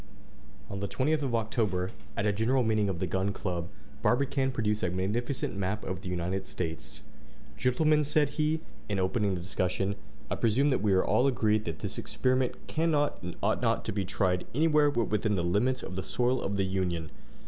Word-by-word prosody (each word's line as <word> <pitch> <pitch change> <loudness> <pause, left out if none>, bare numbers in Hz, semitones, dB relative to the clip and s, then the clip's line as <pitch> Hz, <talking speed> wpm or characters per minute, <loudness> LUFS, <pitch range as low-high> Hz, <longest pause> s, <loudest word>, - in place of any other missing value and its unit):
On 100 - -5
the 100 - -2
20th 150 +8 +1
of 130 -4 0
October, 105 -5 0 0.3
at 100 - 0
a 105 - +3
general 120 +5 +2
meeting 110 -3 +2
of 95 - -2
the 95 - -1
Gun 95 +3 0
Club, 90 -3 -3 0.3
Barbicane 135 +1 +2
produced 105 -4 0
a 95 - +1
magnificent 105 +8 -1
map 100 +2 -2
of 95 -1 -4
the 90 - -6
United 90 +2 -2
States. 75 -4 -5 0.5
"Gentlemen," 150 +4 +3
said 150 0 +2
he, 155 +2 0 0.3
in 100 - 0
opening 95 +1 +1
the 90 - -4
discussion, 95 +1 -1 0.4
"I - - 0
presume 125 +6 +3
that 130 - +1
we 105 -2 +3
are 95 - +3
all 125 - +3
agreed 110 -4 +2
that 80 -3 -3
this - - -2
experiment 130 -1 0
cannot 155 -2 +1
and 90 -1 -5
ought - - +2
not - - +1
to - - -1
be 100 0 -1
tried 90 0 0
anywhere 150 -1 +4
but 120 -5 +1
within 105 0 +1
the 90 - 0
limits 105 +9 +1
of 90 - -6
the 95 - -2
soil 125 +6 0
of 100 +1 -2
the 100 - +2
Union. 90 -4 -1
105 Hz, 195 wpm, -29 LUFS, 95-130 Hz, 0.5 s, anywhere